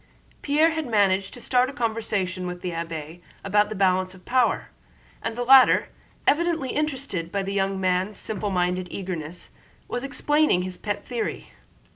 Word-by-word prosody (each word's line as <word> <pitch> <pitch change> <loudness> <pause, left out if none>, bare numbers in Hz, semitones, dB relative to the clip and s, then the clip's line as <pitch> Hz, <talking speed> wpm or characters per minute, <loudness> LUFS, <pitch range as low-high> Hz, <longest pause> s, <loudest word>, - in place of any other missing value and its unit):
Pierre 305 +3 +3
had 320 -3 -3
managed 195 -3 +2
to - - -10
start 250 +1 +2
a - - -8
conversation 210 -7 -2
with 180 0 -6
the 180 - -3
abbé 165 0 -6 0.2
about 205 +1 +2
the 215 - -5
balance 185 -1 +1
of 180 - -18
power, 250 -1 +1 0.5
and 225 0 -3
the 245 - -2
latter, 260 +1 +6 0.4
evidently 325 -4 +2
interested 270 - -2
by 200 -1 -1
the 195 +1 -3
young 195 -1 0
man's 185 +2 0
simple 210 -1 -3
minded 180 -1 0
eagerness, 180 -3 -6 0.4
was 245 - -3
explaining 295 -6 +2
his 185 0 -5
pet 205 +2 -4
theory. 240 -2 -4
200 Hz, 160 wpm, -25 LUFS, 185-250 Hz, 0.5 s, latter